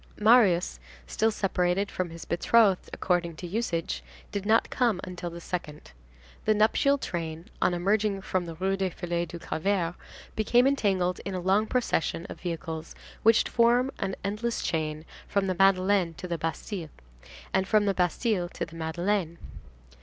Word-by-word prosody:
Marius, 210 Hz, -5 st, +4 dB, 0.3 s
still 220 Hz, -, +1 dB
separated 195 Hz, -1 st, 0 dB
from 185 Hz, -1 st, -2 dB
his 165 Hz, 0 st, -9 dB
betrothed 195 Hz, +2 st, +3 dB
according 175 Hz, -2 st, 0 dB
to 165 Hz, -, -8 dB
usage, 180 Hz, -3 st, -2 dB, 0.3 s
did 200 Hz, 0 st, -3 dB
not 225 Hz, +1 st, +3 dB
come 235 Hz, -7 st, +1 dB
until 180 Hz, -1 st, -5 dB
the 170 Hz, 0 st, -8 dB
second. 165 Hz, -, -6 dB, 0.5 s
The 215 Hz, -, +4 dB
nuptial 225 Hz, +6 st, +3 dB
train, 165 Hz, -, -5 dB
on 175 Hz, -, +3 dB
emerging 200 Hz, +2 st, +1 dB
from 180 Hz, -2 st, -1 dB
the 165 Hz, -, -6 dB
Rue 190 Hz, +3 st, 0 dB
des 190 Hz, -1 st, 0 dB
Filles 175 Hz, 0 st, -3 dB
du 170 Hz, -, -7 dB
Calvaire, 170 Hz, +1 st, -1 dB, 0.4 s
became 240 Hz, +3 st, +3 dB
entangled 195 Hz, -10 st, +1 dB
in 195 Hz, -1 st, -4 dB
a -, -, -1 dB
long 195 Hz, +4 st, +2 dB
procession 195 Hz, -9 st, 0 dB
of -, -, -9 dB
vehicles 165 Hz, -2 st, -5 dB, 0.3 s
which 225 Hz, 0 st, +5 dB
formed 240 Hz, +2 st, +3 dB
an 190 Hz, -1 st, -2 dB
endless 215 Hz, +4 st, -2 dB
chain 155 Hz, -1 st, -2 dB, 0.2 s
from 200 Hz, -1 st, +1 dB
the 185 Hz, -, 0 dB
Madeleine 190 Hz, -2 st, +3 dB
to 180 Hz, -, -7 dB
the 170 Hz, -2 st, -3 dB
Bastille, 165 Hz, +1 st, -4 dB, 0.6 s
and 190 Hz, 0 st, +2 dB
from 215 Hz, 0 st, +3 dB
the 200 Hz, -, +2 dB
Bastille 180 Hz, +1 st, 0 dB
to -, -, -4 dB
the 165 Hz, -, -14 dB
Madeleine. 170 Hz, +2 st, -1 dB
185 Hz, 160 wpm, -28 LUFS, 170-210 Hz, 0.6 s, which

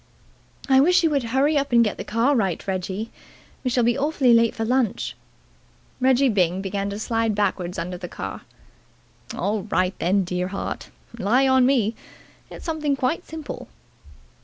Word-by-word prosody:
"I 265 Hz, -1 st, +5 dB
wish 355 Hz, +6 st, +4 dB
you 325 Hz, -, +3 dB
would 280 Hz, -4 st, 0 dB
hurry 280 Hz, +5 st, +2 dB
up 280 Hz, -1 st, -3 dB
and 235 Hz, -1 st, +6 dB
get 210 Hz, -, -1 dB
the -, -, -5 dB
car 235 Hz, +6 st, +1 dB
right, 195 Hz, -7 st, -1 dB
Reggie. 190 Hz, +3 st, -3 dB, 0.5 s
We 255 Hz, -, 0 dB
shall 245 Hz, -1 st, +2 dB
be 240 Hz, +1 st, +3 dB
awfully 275 Hz, -4 st, +3 dB
late 230 Hz, -1 st, +4 dB
for 225 Hz, -, -2 dB
lunch." 250 Hz, -2 st, 0 dB, 0.8 s
Reggie 260 Hz, +1 st, +4 dB
Byng 185 Hz, -5 st, +1 dB
began 195 Hz, +1 st, -3 dB
to 200 Hz, -, -5 dB
slide 225 Hz, 0 st, 0 dB
backwards 190 Hz, -3 st, -1 dB
under 180 Hz, +1 st, -4 dB
the 180 Hz, -, -6 dB
car. 95 Hz, 0 st, -6 dB, 0.9 s
"All 205 Hz, +3 st, -1 dB
right, 185 Hz, -2 st, 0 dB, 0.3 s
dear 180 Hz, 0 st, -2 dB
heart. 195 Hz, +1 st, -5 dB, 0.3 s
Rely 245 Hz, +7 st, +3 dB
on 260 Hz, -1 st, +4 dB
me. 235 Hz, -5 st, +2 dB, 0.6 s
It's -, -, -10 dB
something 310 Hz, -4 st, 0 dB
quite 270 Hz, +7 st, -1 dB
simple." 315 Hz, -2 st, -7 dB
230 Hz, 160 wpm, -23 LUFS, 195-265 Hz, 0.9 s, and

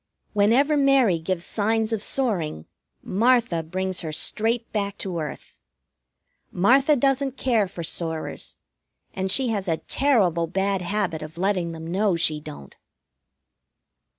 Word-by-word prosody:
Whenever 235 Hz, +9 st, +3 dB
Mary 270 Hz, -, +3 dB
gives 170 Hz, +1 st, -3 dB
signs 220 Hz, +1 st, 0 dB
of 220 Hz, -, -1 dB
soaring, 180 Hz, -, -1 dB, 0.4 s
Martha 230 Hz, -4 st, +2 dB
brings 185 Hz, +3 st, -3 dB
her 160 Hz, -, -5 dB
straight 225 Hz, +9 st, 0 dB
back 200 Hz, -2 st, -2 dB
to 180 Hz, -4 st, -3 dB
earth. 135 Hz, -, -7 dB, 1.0 s
Martha 265 Hz, -, +4 dB
doesn't 270 Hz, 0 st, 0 dB
care 230 Hz, -6 st, +1 dB
for 175 Hz, -2 st, -7 dB
soarers, 160 Hz, 0 st, -3 dB, 0.6 s
and 190 Hz, 0 st, -2 dB
she 255 Hz, +5 st, +3 dB
has 205 Hz, -3 st, -2 dB
a 165 Hz, -2 st, +1 dB
terrible 190 Hz, -, +1 dB
bad 195 Hz, +2 st, -1 dB
habit 180 Hz, -3 st, -2 dB
of 155 Hz, +2 st, -9 dB
letting 180 Hz, -2 st, 0 dB
them 160 Hz, 0 st, -8 dB
know 190 Hz, +3 st, +1 dB
she 155 Hz, -2 st, +1 dB
don't. 70 Hz, -, -11 dB
195 Hz, 130 wpm, -24 LUFS, 170-230 Hz, 1.0 s, Martha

